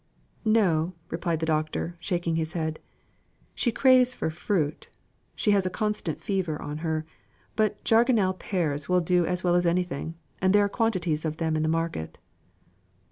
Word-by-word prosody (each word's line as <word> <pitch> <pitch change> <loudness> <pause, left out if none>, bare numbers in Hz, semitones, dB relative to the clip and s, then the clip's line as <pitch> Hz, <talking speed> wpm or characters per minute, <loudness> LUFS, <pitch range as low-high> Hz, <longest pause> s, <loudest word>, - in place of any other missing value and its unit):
"No," 180 -6 +3 0.2
replied 165 -1 -1
the - - +1
Doctor, 155 +2 -1
shaking 175 -2 -1
his 160 0 -2
head. 160 -2 -2 0.7
"She 240 - +1
craves 255 0 +5
for 160 - -2
fruit, 160 -2 -2 0.5
she 210 - +2
has 195 -2 +3
a - - 0
constant 210 -5 -2
fever 185 -6 -2
on 150 +1 -5
her; 160 -1 -2 0.5
but 215 -1 0
jargonelle 225 -4 +3
pears 165 -6 -2
will 180 0 +4
do 175 0 +2
as 180 0 -1
well 175 -1 +3
as 175 0 +3
anything, 170 -2 -1 0.3
and 190 +2 +4
there 205 0 +5
are - - -1
quantities 185 -9 0
of 155 -1 -2
them 160 -1 0
in 155 - 0
the 155 - +1
market." 165 - -2
175 Hz, 165 wpm, -27 LUFS, 160-200 Hz, 0.7 s, craves